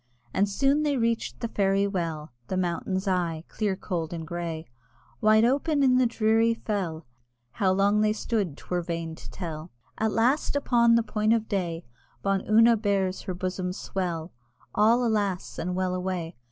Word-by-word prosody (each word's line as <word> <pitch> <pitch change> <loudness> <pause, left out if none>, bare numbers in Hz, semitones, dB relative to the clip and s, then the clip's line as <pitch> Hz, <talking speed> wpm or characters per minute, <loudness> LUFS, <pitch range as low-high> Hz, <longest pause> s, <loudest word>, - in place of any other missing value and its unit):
And 200 +1 +2
soon 275 +8 +2
they 290 -2 +1
reached 230 -1 -1
the 235 - -1
Fairy 195 -2 +1
Well, 165 -6 -3 0.2
The 185 - -2
mountain's 185 +2 -1
eye, 170 -4 0
clear, 205 -3 -1
cold, 175 -4 -4
and 165 -1 -5
grey, 165 -1 -4 0.6
Wide 215 +1 +5
open 285 +3 +2
in 255 -1 +5
the 255 - +4
dreary 225 0 +2
fell: 180 -8 -3 0.5
How 190 +5 +1
long 200 +2 +3
they 215 0 +3
stood 210 -7 -2
'twere 180 -1 -3
vain 165 -1 -4
to - - -11
tell, 165 -2 -6 0.3
At 220 0 +1
last 250 +8 +1
upon 235 -4 +4
the 230 - +3
point 215 0 +1
of 225 -1 0
day, 175 -4 -2 0.4
Bawn 195 -1 +1
Una 230 +2 +6
bares 200 -3 0
her 185 - -2
bosom's 185 0 -3
swell, 175 -3 -3 0.4
(All, 230 +4 +4
alas! 205 -5 -1
and 180 +2 -2
well 185 0 0
away!) 180 -2 -3
195 Hz, 165 wpm, -27 LUFS, 175-225 Hz, 0.6 s, Una